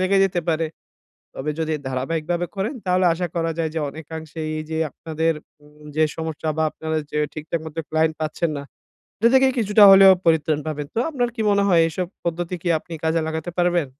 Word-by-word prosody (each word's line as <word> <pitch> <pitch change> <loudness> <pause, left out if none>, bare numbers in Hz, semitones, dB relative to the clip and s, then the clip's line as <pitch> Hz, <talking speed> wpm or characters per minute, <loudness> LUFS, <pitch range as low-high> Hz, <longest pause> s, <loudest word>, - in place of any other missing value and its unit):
লেগে 190 +1 +3
যেতে 180 -2 0
পারে। 165 0 0 0.7
তবে 150 +3 -2
যদি 160 -1 -1
ধারাবাহিকভাবে 160 +6 -2
করেন, 200 +8 -2
তাহলে 185 0 +2
আশা 175 +1 -2
করা 165 -1 0
যায় 165 -1 0
যে, - - 0
অনেকাংশেই 160 +1 -6 0.2
যে 160 - -2
আপনাদের 160 0 -1 0.6
যে 155 - +3
সমস্যা 160 -1 -3
বা 160 - +2
আপনারা 160 0 -3
যে 150 - -2 0.2
ঠিকঠাক 155 +2 -3
মত 160 -1 -8
ক্লায়েন্ট 160 0 +1
পাচ্ছেন 160 +1 -1
না, 140 - -5 0.6
এটা 230 - +4
থেকেই 265 0 +5
কিছুটা 210 -1 +5
হলেও 195 0 +9
পরিত্রাণ 155 -2 +2
পাবেন। 150 -2 -3
তো, - - -1
আপনার 245 -5 0
কি 225 - -1
মনে 200 0 +3
হয়, 170 -3 +5
এসব 180 +2 -3 0.2
পদ্ধতি 170 +1 -2
কি 180 - -1
আপনি 170 - -14
কাজে 160 +1 +2
লাগাতে 160 +2 -4
পারবেন? 175 -3 +2
165 Hz, 185 wpm, -22 LUFS, 155-180 Hz, 0.7 s, হলেও